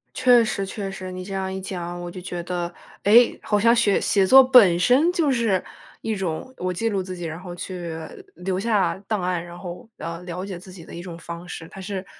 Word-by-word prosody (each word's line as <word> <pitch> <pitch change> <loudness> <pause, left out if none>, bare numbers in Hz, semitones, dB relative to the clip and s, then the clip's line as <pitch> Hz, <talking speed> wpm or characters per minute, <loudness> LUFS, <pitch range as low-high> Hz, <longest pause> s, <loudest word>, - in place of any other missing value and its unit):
确 245 -2 +5
实 195 -2 -2
确 195 0 -5
实， 185 -1 -7
你 185 0 -6
这 195 - -7
样 190 0 -2
一 190 - -4
讲， 175 -2 -5
我 175 0 -5
就 180 0 -8
觉 175 -1 -5
得， 175 -1 -3 0.3
诶， 230 +4 +6
好 210 -1 +1
像 230 +3 +5
雪 215 -4 +3
写 195 -2 +2
作 265 +7 +9
本 225 -10 +6
身 265 - +4
就 320 -6 +1
是 225 -7 +1 0.4
一 220 - -2
种 190 +7 -4
我 185 0 -2
记 225 +6 -1
录 200 -3 0
自 185 0 -6
己， 175 - -7
然 160 0 -5
后 180 -1 -8
去 175 -2 -6 0.4
留 185 +1 -2
下 210 -2 +1
档 215 -4 -1
案， 180 -2 -1
然 175 0 -10
后， 180 +4 -8
呃， 165 +1 -6
了 180 +2 -5
解 185 -3 -6
自 185 +1 -13
己 175 -3 -12
的 - - -12
一 170 - -6
种 175 -2 -8
方 170 +1 -8
式。 165 - -7
它 195 - -10
是 190 0 -5
185 Hz, 250 characters per minute, -23 LUFS, 175-210 Hz, 0.4 s, 作